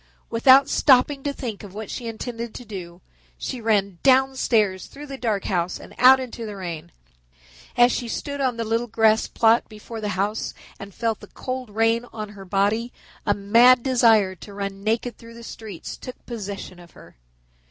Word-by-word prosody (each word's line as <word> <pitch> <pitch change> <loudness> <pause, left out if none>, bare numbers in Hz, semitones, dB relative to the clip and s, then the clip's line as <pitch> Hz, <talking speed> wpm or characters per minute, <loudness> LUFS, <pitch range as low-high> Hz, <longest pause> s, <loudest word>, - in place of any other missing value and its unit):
Without 260 +4 +6
stopping 275 +1 +4
to 285 - -2
think 235 -7 -6
of 200 -1 -11
what 215 -1 -6
she 240 - -5
intended 230 0 -6
to 245 - -8
do, 180 -4 -8 0.4
she 255 -3 -5
ran 200 -5 +1
downstairs 255 -7 +2
through 290 +1 -10
the 275 -2 -7
dark 220 -6 -1
house 175 -2 -1
and - - -13
out 260 +1 +8
into 245 -2 -6
the 210 -2 -6
rain. 170 -5 -6 0.9
As 245 0 +6
she 240 - -2
stood 285 +4 -4
on 255 -3 0
the 230 - -1
little 230 +2 -1
grass 220 0 +3
plot 225 +1 +3
before 220 +1 -9
the 210 - -2
house 205 +3 -2 0.2
and 200 0 -9
felt 225 +2 -2
the - - -12
cold 255 -2 -6
rain 225 +3 +1
on 215 -2 -6
her 200 -2 -11
body 205 +5 0 0.4
a 205 - +3
mad 235 +5 +5
desire 225 -7 +4
to 200 +2 -11
run 195 -1 -5
naked 225 +2 -1
through 230 0 -13
the 235 - -11
streets 215 -6 -8
took 255 - -10
possession 200 -5 -7
of 175 -2 -16
her. - - -16
225 Hz, 185 wpm, -23 LUFS, 200-245 Hz, 0.9 s, out